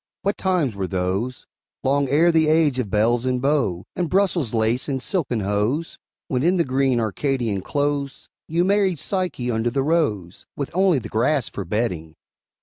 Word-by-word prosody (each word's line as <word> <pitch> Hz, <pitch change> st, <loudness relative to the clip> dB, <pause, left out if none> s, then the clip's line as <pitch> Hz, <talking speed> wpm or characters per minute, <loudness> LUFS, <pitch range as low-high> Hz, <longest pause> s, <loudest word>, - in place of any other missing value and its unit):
What 200 Hz, +1 st, 0 dB
times 180 Hz, -, 0 dB
were 95 Hz, -2 st, -3 dB
those, 95 Hz, +7 st, -2 dB, 0.4 s
Long 140 Hz, +1 st, +2 dB
ere 165 Hz, +5 st, +4 dB
the 160 Hz, -1 st, +3 dB
age 155 Hz, -4 st, +3 dB
of 115 Hz, -5 st, -2 dB
belles 115 Hz, +4 st, +2 dB
and 130 Hz, -1 st, 0 dB
beaux, 125 Hz, -, 0 dB
And 175 Hz, -3 st, -1 dB
Brussels 185 Hz, -, +1 dB
lace 115 Hz, +4 st, +1 dB
and 135 Hz, -1 st, -1 dB
silken 130 Hz, -, -1 dB
hose, 105 Hz, +11 st, -1 dB, 0.3 s
When, 125 Hz, -2 st, -1 dB
in 175 Hz, +5 st, +2 dB
the 170 Hz, -, +2 dB
green 130 Hz, -1 st, +1 dB
Arcadian 115 Hz, -2 st, -1 dB
close, 145 Hz, +3 st, -2 dB, 0.2 s
You 170 Hz, +2 st, +1 dB
married 195 Hz, -2 st, +2 dB
Psyche 180 Hz, -8 st, -1 dB
under 115 Hz, +1 st, 0 dB
the 135 Hz, +2 st, -1 dB
rose, 135 Hz, -, -1 dB
With 140 Hz, -, -3 dB
only 185 Hz, -2 st, +3 dB
the 115 Hz, -4 st, -4 dB
grass 125 Hz, +4 st, +1 dB
for 100 Hz, -, -6 dB
bedding! 90 Hz, -6 st, -2 dB
135 Hz, 170 wpm, -22 LUFS, 110-160 Hz, 0.4 s, ere